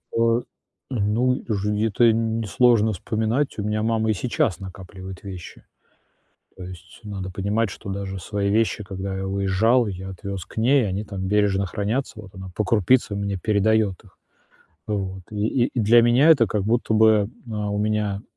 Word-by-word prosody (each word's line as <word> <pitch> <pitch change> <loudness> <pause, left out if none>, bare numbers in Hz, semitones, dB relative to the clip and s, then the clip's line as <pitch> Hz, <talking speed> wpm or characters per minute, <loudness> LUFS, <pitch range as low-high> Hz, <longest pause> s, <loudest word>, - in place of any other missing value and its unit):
А, 115 +1 +3 0.5
ну, 120 +1 +1
и - - -7
уже 105 0 0
где-то 110 +2 +2
н 115 0 0
несложно 110 0 +3
вспоминать, 110 +9 -1
у - - -2
меня 105 +1 -1
мама 110 -1 +1
и - - +3
сейчас 105 -4 -1
накапливает 95 0 -9
вещи. 95 -3 -9 0.9
То 95 - -8
есть 90 0 -11
надо 95 -3 -6
понимать, 100 +4 -1
что 100 - -9
даже 95 0 -4
свои 100 +2 -2
вещи, 110 0 +1
когда 95 0 -5
я 95 - -3
уезжал, 100 +5 +2
я 95 0 -6
отвез 95 0 -6
к - - -17
ней, 125 0 +3
они 100 +3 -3
там 95 -2 -5
бережно 100 -1 +2
хранятся, 105 +5 -3
вот 100 -2 -12
она 95 0 -8
по 105 - 0
крупице 110 +2 +2
мне 100 -1 -2
передает 105 0 +1
их. 95 - -21 0.7
Вот, 95 -3 -3
и 110 +4 0
и 125 - -3
для 115 +3 +6
меня 125 +7 +5
это 135 -8 +6
как 105 -2 -1
будто 115 +1 +1
бы, 110 -2 +4 0.2
а, 105 -1 -2
у 105 - -2
меня 105 -1 -1
105 Hz, 175 wpm, -23 LUFS, 95-110 Hz, 0.9 s, для